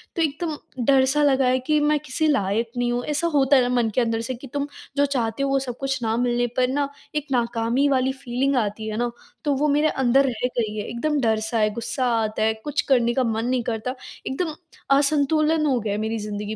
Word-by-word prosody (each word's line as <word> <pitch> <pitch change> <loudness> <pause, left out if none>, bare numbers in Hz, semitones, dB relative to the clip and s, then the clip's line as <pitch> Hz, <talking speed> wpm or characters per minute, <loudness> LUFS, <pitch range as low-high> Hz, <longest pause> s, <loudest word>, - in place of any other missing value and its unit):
तो 335 - 0
एकदम 310 0 -1 0.3
डर-सा 270 +2 +4
लगा 270 -2 +3
है 255 +1 +3
कि 300 +4 +1
मैं 295 0 +2
किसी 300 +2 -1
लायक 225 -3 +1
नहीं 240 0 +1
हूँ। 245 0 -1
ऐसा 300 +3 0
होता 275 0 +4
है 260 - +6
ना 245 - 0
मन 235 -2 +2
के 255 - +3
अंदर 225 -1 0
से 255 +2 -4
कि 265 +3 -11
तुम 285 0 -1 0.3
जो 285 - +4
चाहते 265 -1 -1
हो, 275 - 0
वो 275 0 +2
सब 245 -3 -5
कुछ 270 -2 -2
ना 225 0 0
मिलने 245 0 +1
पर 250 0 +3
ना 280 +1 -1 0.3
एक 300 -1 -2
नाकामी 240 +2 +1
वाली 265 -1 +2
फीलिंग 265 +2 0
आती 220 -1 -1
है 215 0 -3
ना, 240 0 0 0.3
तो 290 -2 +1
वो 295 +3 +1
मेरे 295 +2 +3
अंदर 265 +1 +3
रह 245 0 -1
गई 215 -2 -1
है। 210 - -4
एकदम 295 +5 -1
डर-सा 220 0 0
है, 215 0 +3
गुस्सा 245 +3 -2 0.2
आता 215 0 -1
है, 220 0 +3
कुछ 295 - 0
करने 240 -2 +4
का 260 - +1
मन 225 0 -1
नहीं 250 -1 0
करता, 245 +2 -3 0.3
एकदम 310 +4 -2 0.4
असंतुलन 305 +2 +2
हो 260 -4 +2
गया 210 -2 -2
है 210 - -2
मेरी 220 +1 -2
जिंदगी 210 0 -4
255 Hz, 230 wpm, -23 LUFS, 230-280 Hz, 0.4 s, है